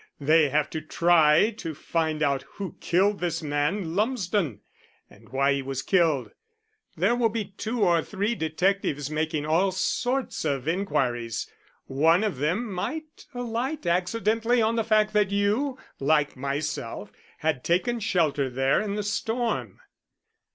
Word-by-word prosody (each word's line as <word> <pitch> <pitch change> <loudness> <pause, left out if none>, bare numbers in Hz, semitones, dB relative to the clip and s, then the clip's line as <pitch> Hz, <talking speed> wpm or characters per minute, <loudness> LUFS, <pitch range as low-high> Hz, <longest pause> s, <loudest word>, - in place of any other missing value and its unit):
"They 155 +1 +4
have 150 +2 +1
to 160 - -3
try 165 +4 +4
to 160 -2 -5
find 160 0 -1
out 140 -2 +1
who 195 -2 -6
killed 195 +4 +2
this 170 -2 -2
man 155 +4 -1
Lumsden 200 - 0 0.5
and - - -18
why 135 +2 +2
he 140 - -1
was 135 0 -4
killed. 165 -8 +2 0.7
There 195 +9 +3
will 240 -2 +2
be 210 -3 -4
two 225 +2 -2
or 170 -2 +4
three 205 +6 -2
detectives 160 - -1
making 155 -1 -1
all 170 +5 +2
sorts 245 +7 -1
of 140 -1 -2
inquiries. 125 - -1 0.4
One 160 +8 +3
of 210 -10 -1
them 185 - -1
might 310 - -5
alight 245 - -3
accidentally 220 +7 +1
on 225 0 +2
the 225 - +1
fact 215 -1 +2
that 210 -2 +3
you, 210 +7 0 0.2
like 150 +1 +2
myself, 135 -6 -4 0.3
had 155 -5 -1
taken 235 +8 +1
shelter 155 -10 +1
there 135 +5 +1
in 205 -1 -3
the 210 - -2
storm." 225 +2 -2
175 Hz, 145 wpm, -26 LUFS, 150-215 Hz, 0.7 s, They